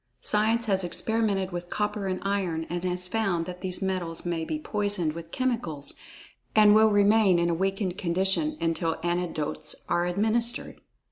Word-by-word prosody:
Science 220 +2 +2
has 190 -3 +1
experimented 200 +1 0
with 175 0 -5
copper 210 -1 -2
and 185 -1 -2
iron, 185 -5 -1
and 175 0 -3
has 180 0 -1
found 190 -5 0
that 180 0 -8
these 185 0 -1
metals 180 -4 -2
may 170 -2 -1
be 305 - -3
poisoned 205 - 0
with 165 0 -8
chemicals, 200 - -2 0.6
and 210 -1 +7
will 220 +1 +6
remain 205 -2 +4
in 170 0 +1
a - - +1
weakened 190 +1 -1
condition 190 - +1
until 165 0 0
antidotes 175 -3 -2
are 175 0 +1
administered. 220 +6 0
190 Hz, 155 wpm, -27 LUFS, 175-210 Hz, 0.6 s, and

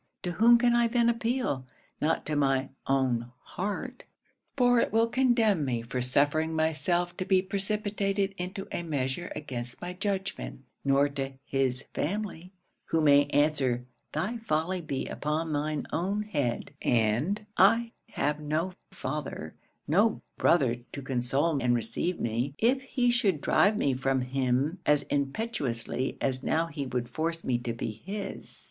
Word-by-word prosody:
To 180 - -1
whom 235 +6 +6
can 240 0 +3
I 240 0 +4
then 235 0 +3
appeal? 230 - -1 0.3
Not 160 +2 +1
to 155 - -1
my 135 -2 +2 0.2
own 125 -3 +1
heart, 200 +3 -4 0.5
for 245 -2 +5
it - - +1
will 225 +2 +4
condemn 230 - +3
me 120 -4 -1
for 125 +2 -3
suffering 145 +5 +2
myself 175 +3 0
to - - -1
be 185 -1 +3
precipitated 200 0 -1
into 190 +2 -5
a - - -2
measure 145 0 -2
against 125 -5 -6
my 180 +1 -5
judgment; 195 -7 -3 0.2
nor 140 +1 +4
to 135 -1 -4
his 130 -2 0
family, 185 0 -3 0.3
who 165 - +1
may 145 -2 +6
answer, 140 -4 +1 0.3
"thy 235 +5 -2
folly 180 -3 -1
be 140 -4 -3
upon 155 +1 -2
thine 150 0 -1
own 195 +5 0
head;" 145 - -2
and 120 - +1
I 230 +4 +5 0.2
have 150 +1 0
no 155 +5 -1 0.2
father, 145 - -5 0.3
no 205 +8 +3 0.2
brother 130 -8 +3 0.2
to 140 - -5
console 135 +4 0
and 120 0 +3
receive 120 +10 -2
me, 120 +5 -1
if 255 +4 +3
he 250 -2 +1
should 210 - +2
drive 205 +8 +3
me 140 - +2
from 135 0 0
him 130 +5 0
as 150 -1 +3
impetuously 140 - -1
as 130 -1 0
now 160 +4 +1
he 145 -4 -5
would 125 -1 -2
force 165 +6 -2
me 125 -2 +1
to 120 -1 -3
be 110 -1 -5
his. 200 +1 -5
155 Hz, 150 wpm, -29 LUFS, 135-200 Hz, 0.5 s, whom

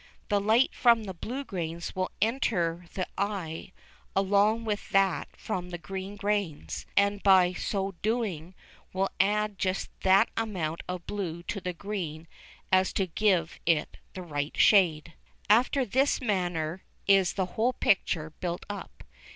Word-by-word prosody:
The 205 -2 +2
light 220 +6 +3
from 235 -2 +4
the 190 -2 -6
blue 250 +10 -5
grains 170 -6 -5
will 185 0 -1
enter 180 -8 0
the 185 - -1
eye 190 -5 -3 0.4
along 205 +4 +3
with 210 -2 -3
that 195 -1 +2
from 180 -1 -4
the 175 - -5
green 190 +4 -6
grains, 160 - -2
and 200 0 +3
by 185 -2 +5
so 195 +1 -2
doing 195 -7 -2 0.4
will 190 +1 0
add 210 +1 +1
just 190 0 -1
that 190 +1 +5
amount 180 -8 -2
of 180 -1 -5
blue 175 -5 -4
to 200 - -4
the 180 0 -3
green 170 -4 -5 0.4
as 185 0 +4
to 195 - +1
give 180 -2 +1
it 165 -3 +1 0.2
the 185 - -5
right 145 -3 -4
shade. 170 -5 +4 0.4
After 255 +4 +4
this 265 +6 +2
manner 180 - -1 0.2
is 195 -2 +4
the 190 - 0
whole 240 +3 +1
picture 160 -8 +1
built 175 -1 -3
up. 205 - -9
190 Hz, 145 wpm, -28 LUFS, 170-205 Hz, 0.4 s, by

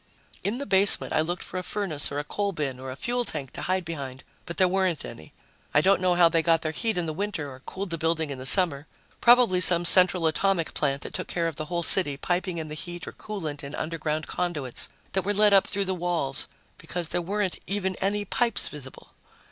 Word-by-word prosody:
In 210 +5 -2
the 280 - -5
basement, 195 -3 +6
I 155 - +3
looked 175 +3 -3
for 185 - -6
a - - -6
furnace 180 -9 -2
or 140 - -4
a 145 - -2
coal 200 +6 -3
bin 140 -6 -3
or 130 0 -7
a 130 - -6
fuel 245 - -2
tank 145 - -5
to - - -6
hide 185 0 -1
behind, 140 -5 -6 0.2
but 170 - -6
there 185 - +4
weren't 185 -4 0
any. 80 - -11 0.4
I 145 - +6
don't 190 +2 +3
know 180 -1 +2
how 175 -1 +6
they 165 0 +1
got 165 0 +2
their 155 - -2
heat 220 +6 -2
in 175 - 0
the 155 - -3
winter 165 -6 -4
or 130 - -11
cooled 190 +7 -6
the 165 - -3
building 160 -2 -1
in 135 - -6
the 130 - -2
summer. 160 -2 +4 0.3
Probably 240 -7 +5
some 175 -1 +6
central 180 -1 +5
atomic 170 +1 0
plant 140 -2 -1
that - - -8
took - - -4
care 170 -1 -1
of 165 - -5
the 155 - -4
whole 170 +1 -3
city, 155 -6 +5
piping 180 +3 -2
in 160 -1 -4
the 150 - -7
heat 175 +2 -5
or - - -5
coolant 160 -9 -6
in 140 +1 -7
underground 155 -1 -3
conduits 150 -8 -3 0.2
that 190 - 0
were 205 +2 -2
led 210 0 +4
up 195 - +5
through 200 0 -1
the 190 - -1
walls, 170 -6 -2 0.3
because 175 -2 -5
there 175 - -1
weren't 195 +1 -2
even 190 -1 -2
any 205 +1 -1
pipes 235 +3 0
visible. 135 -3 -11
175 Hz, 235 wpm, -26 LUFS, 155-190 Hz, 0.4 s, basement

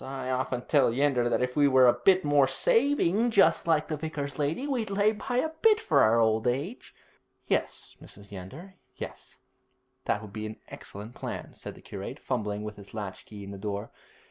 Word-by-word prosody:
I 135 -1 -4
often 125 -1 -2
tell 140 -6 +3
Yeander 125 -1 +2
that 125 - +1
if 125 0 -2
we 145 -1 +5
were 130 -2 +6
a 120 - +7
bit 185 +9 +3
more 145 -2 +4
saving, 280 - +2 0.4
like 155 -2 +2
the 155 - -2
vicar's 150 -2 -5
lady, 150 - -1
we'd 250 -7 -2
lay 205 +2 +3
by 220 +3 -4
a 285 +6 +1
bit 440 -1 +5
for 445 - +2
our 115 +2 +4
old 110 0 +2
age.' 140 - -3 0.5
'Yes, - - -2
Mrs. 100 0 -12
Yeander, 115 - -9 0.2
yes; - - -9 0.7
that 105 +1 0
would 105 -2 -11
be 110 0 -4
an 110 - -8
excellent 105 +4 -9
plan,' - - -6
said - - -9
the - - -15
curate, - - -7
fumbling 105 -1 -3
with 105 0 -7
his 100 +1 -13
latch 100 -4 -6
key 105 -2 -9
in 100 - -8
the 100 - -8
door. 100 +1 -4
130 Hz, 195 wpm, -28 LUFS, 110-175 Hz, 0.7 s, a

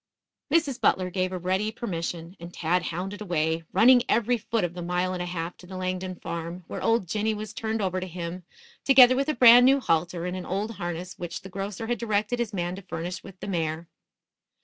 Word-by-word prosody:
Mrs. 285 -6 +1
Butler 185 -4 +2
gave 185 0 -1
a 185 - -3
ready 190 +4 0
permission, 170 -5 -5
and 170 +1 -9
Tad 175 +1 0
hounded 190 +5 -4
away, 165 -4 -1
running 245 +6 +6
every 235 +2 +3
foot 225 -2 -2
of 175 -1 -2
the 180 - -6
mile 180 +1 -1
and 180 - -3
a 180 - -3
half 175 -1 -4
to 180 - -15
the 185 0 -7
Langdon 185 0 -3
farm, 170 +1 -6
where - - -6
old 225 -5 +2
Jinny 215 +4 0
was 215 0 -6
turned 220 -1 -2
over 185 -1 -1
to 185 - -5
him, 175 +1 -6 0.4
together 255 -2 +7
with 275 +3 0
a 305 - 0
brand 245 0 +9
new 275 +1 +5
halter 170 -4 0
and 180 0 -3
an 185 - -5
old 205 +4 -3
harness 175 0 -5
which 175 -1 -5
the 190 - -9
grocer 195 +3 -5
had 240 -1 -2
directed 215 +1 0
his 235 -3 -1
man 175 -2 -2
to - - -8
furnish 180 0 -5
with 195 -2 -12
the - - -5
mare. 165 -3 -2
185 Hz, 215 wpm, -26 LUFS, 175-220 Hz, 0.4 s, brand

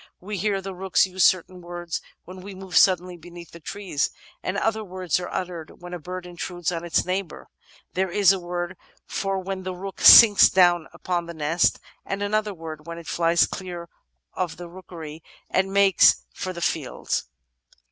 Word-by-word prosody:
We 200 +1 -5
hear 200 0 0
the 195 0 -6
rooks 190 +1 +2
use 185 -1 -1
certain 185 0 +2
words 175 -1 -5 0.2
when 185 +1 -10
we 195 +1 -9
move 190 -1 -9
suddenly 180 -1 +4
beneath 170 +1 -12
the 170 - -12
trees, 190 -4 -2 0.3
and 185 +2 -3
other 220 +1 0
words 185 -3 -2
are 180 - -6
uttered 175 -4 -6
when 175 0 -10
a 175 - -5
bird 180 +3 -7
intrudes 175 -1 -4
on 165 -1 -4
its 170 - 0
neighbour; 185 -1 -4 0.4
there 190 +1 0
is 195 +1 +4
a 190 - -3
word 175 +1 -5 0.5
when 195 -1 -3
the 185 0 -5
rook 195 +2 -8
sinks 210 -4 +10
down 175 -3 +4
upon 175 0 -3
the 170 - -8
nest, 160 +3 +1 0.2
and 195 +1 -4
another 210 +1 0
word 160 -3 -9
when 170 0 -6
it 170 - -10
flies 170 0 +2
clear 175 -2 -7 0.4
of 180 -3 -3
the 175 0 -8
rookery 165 -3 -10 0.3
and 190 0 +1
makes 195 -2 +5
for 185 - -5
the 170 -1 -8
fields. 155 -6 -2
180 Hz, 180 wpm, -24 LUFS, 170-190 Hz, 0.5 s, sinks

